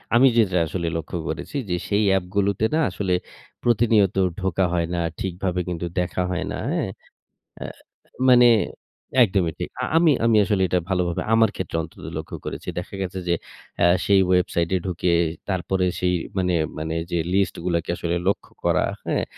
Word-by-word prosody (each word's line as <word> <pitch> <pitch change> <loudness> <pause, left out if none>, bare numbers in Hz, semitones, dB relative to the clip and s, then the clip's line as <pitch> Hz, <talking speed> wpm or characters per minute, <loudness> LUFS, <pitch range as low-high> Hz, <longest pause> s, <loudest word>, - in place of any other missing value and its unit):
আমি 130 +3 +7
যেটা 95 -5 +3
আসলে 85 +1 -3
লক্ষ্য 80 +2 -5
করেছি। 80 - -5
যে 90 - +1
সেই 105 +1 +2
অ্যাপগুলোতে 95 +2 +1
না 160 - +3
আসলে 95 0 -2 0.5
প্রতিনিয়ত 110 -4 +3 0.2
ঢোকা 95 0 +1
হয় 85 -1 +1
না, 85 - -1 0.2
ঠিকভাবে 90 -1 -2
কিন্তু 85 0 -3
দেখা 90 +1 -1
হয় 90 +1 -2
না 105 - -3 0.2
হ্যাঁ। 165 - -1 0.7
আ - - -4 0.6
মানে 125 -1 +7 0.8
একদমই 90 -6 +1
ঠিক। - - -3
আ - - -1
আমি, 165 -2 +5
আমি, 115 -2 +4
আসলে 100 -3 +1
এটা 90 +1 +1
ভালোভাবে 90 -2 0
আমার 115 -2 +5
ক্ষেত্রে 90 -3 -3
অন্তত 80 - -10
লক্ষ্য 80 - -6
করেছি। - - -6
দেখা 100 +3 -8
গেছে 95 0 -3
যে 85 - +3 0.5
আ - - +7 0.2
সেই 100 -1 +5
ওয়েবসাইটে 90 -1 +1
ঢুকে 90 -1 0 0.4
তারপরে 95 0 0
সেই 90 0 +1 0.2
মানে, 90 -1 +1 0.2
মানে, 80 +1 -3 0.2
যে 85 - +1 0.2
লিস্টগুলাকে 85 -3 0
আসলে 85 0 -1
লক্ষ্য 100 - -1
করা, - - +2 0.2
হ্যাঁ? - - 0
95 Hz, 160 wpm, -23 LUFS, 85-100 Hz, 0.8 s, আমি